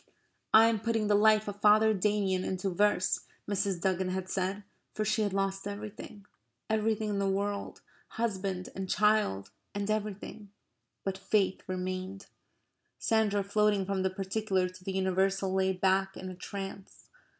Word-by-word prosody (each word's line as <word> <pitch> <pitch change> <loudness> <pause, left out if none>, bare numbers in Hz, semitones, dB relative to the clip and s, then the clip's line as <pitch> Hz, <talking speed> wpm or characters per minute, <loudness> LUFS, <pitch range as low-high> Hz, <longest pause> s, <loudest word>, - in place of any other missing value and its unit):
"I 220 +1 +8
am 225 -2 +1
putting 225 0 0
the 210 - +2
life 215 +1 +4
of 205 0 -6
Father 215 +1 +6
Damien 195 -2 +1
into 190 +1 -2
verse," 205 0 +2 0.3
Mrs. 200 -2 0
Duggan 185 0 0
had 185 0 -3
said, 195 +2 -2 0.3
for 215 - -1
she 220 - +1
had 205 -1 +1
lost 195 0 -1
everything 205 0 -8 0.5
everything 220 0 +1
in 200 - -1
the 195 0 +1
world, 200 +1 -2 0.3
husband 195 -5 -3
and 190 -1 -5
child 210 - +2 0.2
and 205 +1 -1
everything, 210 0 -4 0.5
but 195 -1 -3
faith 195 -1 +1
remained. 185 +1 -4 0.7
Sandra, 210 -3 +1
floating 205 0 +2
from 195 0 -1
the 190 - +1
particular 190 0 -1
to 185 0 -13
the 195 - -3
universal, 190 0 +1
lay 190 0 +2
back 190 +1 +1
in 185 - -6
a - - -8
trance. 195 +1 -8
195 Hz, 150 wpm, -30 LUFS, 190-210 Hz, 0.7 s, I